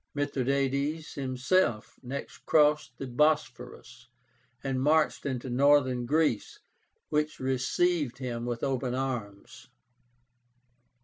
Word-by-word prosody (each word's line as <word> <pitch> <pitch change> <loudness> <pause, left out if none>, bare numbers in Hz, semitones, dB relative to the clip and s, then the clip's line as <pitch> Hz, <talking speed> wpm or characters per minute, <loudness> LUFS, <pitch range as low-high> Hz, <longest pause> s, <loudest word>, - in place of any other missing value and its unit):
Mithradátes 140 +2 -1
himself 130 -2 0
next 135 +2 -7
crossed 150 -4 +3
the 135 - -5
Bosphorus, 125 -3 -1 0.6
and 135 -2 -1
marched 150 +1 +2
into 130 -1 -3
Northern 130 -1 +3
Greece, 150 -7 +1 0.5
which 150 0 -1
received 135 +3 0
him 120 -3 -4
with 120 -1 -4
open 130 -2 -1
arms. 120 -7 -5
135 Hz, 90 wpm, -29 LUFS, 125-150 Hz, 0.6 s, crossed